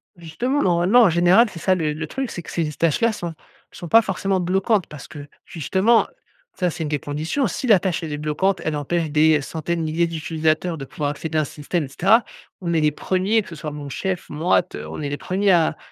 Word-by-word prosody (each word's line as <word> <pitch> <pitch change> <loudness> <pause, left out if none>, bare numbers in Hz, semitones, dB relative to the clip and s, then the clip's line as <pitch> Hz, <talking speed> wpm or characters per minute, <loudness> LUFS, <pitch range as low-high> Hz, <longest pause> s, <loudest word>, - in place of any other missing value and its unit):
Justement, 235 - -2
normalement 180 +7 +4
en 205 - +5
général, 175 +7 +5
c'est 175 - -9
ça 185 +2 +2
le 155 -4 -1
le 155 0 -5
truc, 265 - -4
c'est 175 - -6
que - - -12
ces 160 -3 -1
tâches-là 165 +9 +1
sont 175 -6 -5 0.4
sont 175 - -9
pas 225 +7 +6
forcément 195 -2 -1
bloquantes 190 +2 +1
parce 150 -3 -10
que, 145 -1 -10 0.2
justement, 190 - +2 0.5
ça 180 -2 +1
c'est 170 - -7
1 150 - -3
des 150 - 0
conditions. 155 - -2
Si 255 - -4
la 210 -5 +6
tâche 180 -2 -2
elle 160 - -5
est - - -3
bloquante, 155 +6 0
elle 155 - -1
empêche 155 +2 -2
des 155 0 +4
centaines 165 +4 -3
de 155 -1 -2
milliers 170 +2 +1
d'utilisateurs 160 +1 -1
de 135 - -6
pouvoir 145 +1 -3
accéder 155 +2 -4
à - - +4
un - - 0
système 150 +4 -3
et - - -9
cetera, 195 - +3 0.4
on 170 -2 -2
est 160 - +2
les 150 0 +3
1ers 190 +8 0
que - - -13
ce 170 - -8
soit 150 0 -6
mon 145 -1 -7
chef 185 +7 -3
moi 160 +5 +2
t 180 - -9
on - - -6
est 145 - -3
les 145 - -3
1ers 195 +5 +1
à 165 -3 +3
170 Hz, 240 wpm, -22 LUFS, 155-190 Hz, 0.5 s, pas